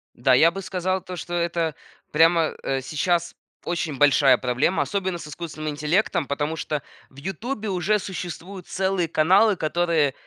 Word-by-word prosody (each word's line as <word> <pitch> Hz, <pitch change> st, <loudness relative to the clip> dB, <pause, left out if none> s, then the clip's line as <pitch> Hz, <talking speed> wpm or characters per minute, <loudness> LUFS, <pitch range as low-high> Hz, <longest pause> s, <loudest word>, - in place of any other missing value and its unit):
Да, 130 Hz, +2 st, +3 dB
я 160 Hz, +6 st, +6 dB
бы 195 Hz, +3 st, -6 dB
сказал, 185 Hz, 0 st, -2 dB
то 180 Hz, 0 st, -8 dB
что 175 Hz, 0 st, -7 dB
это 170 Hz, -2 st, -1 dB, 0.4 s
прямо, 165 Hz, +1 st, +4 dB
э, 135 Hz, -1 st, -1 dB
сейчас 170 Hz, +5 st, -1 dB, 0.3 s
очень 165 Hz, -4 st, -2 dB
большая 145 Hz, -1 st, +5 dB
проблема, 130 Hz, +8 st, +1 dB
особенно 190 Hz, -3 st, -2 dB
с 165 Hz, -, -9 dB
искусственным 155 Hz, 0 st, -6 dB
интеллектом. 150 Hz, +2 st, 0 dB
Потому 145 Hz, +2 st, -2 dB
что 150 Hz, -2 st, -3 dB, 0.3 s
в -, -, -24 dB
"Ютубе" 210 Hz, -, -4 dB
уже 195 Hz, +3 st, +1 dB
существуют 185 Hz, -1 st, -7 dB
целые 190 Hz, -2 st, 0 dB
каналы, 190 Hz, +7 st, +4 dB
которые 160 Hz, -3 st, +1 dB
170 Hz, 150 wpm, -24 LUFS, 150-185 Hz, 0.4 s, я